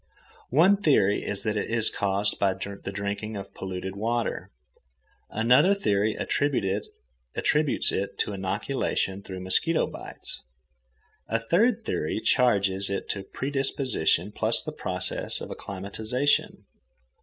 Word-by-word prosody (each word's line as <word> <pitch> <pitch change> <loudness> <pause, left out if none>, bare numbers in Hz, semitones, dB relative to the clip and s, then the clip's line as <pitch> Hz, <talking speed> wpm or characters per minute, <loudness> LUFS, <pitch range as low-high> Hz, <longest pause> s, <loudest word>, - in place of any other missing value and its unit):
One 175 +9 +5
theory 135 - +3
is 100 -1 -1
that 105 0 0
it - - -2
is 115 -1 +2
caused 100 +1 0
by 95 -1 +2
the 100 0 -6
drinking 100 +2 -3
of 100 - -8
polluted 95 0 -5
water. 115 +3 -1 0.8
Another 125 - +4
theory 105 - +1
attributes 105 -8 0 1.0
it 100 +1 -2
to 105 - 0
inoculation 100 0 -1
through 95 -2 -7
mosquito 160 - +1
bites. - - -5 0.9
A 115 - +1
third 210 - +2
theory 75 - -1
charges 100 -6 +2
it 100 - -3
to 100 - -2
predisposition 135 - 0
plus - - +2
the - - -4
process - - 0
of - - -7
acclimatization. 110 +8 -1
105 Hz, 120 wpm, -27 LUFS, 100-130 Hz, 1.0 s, One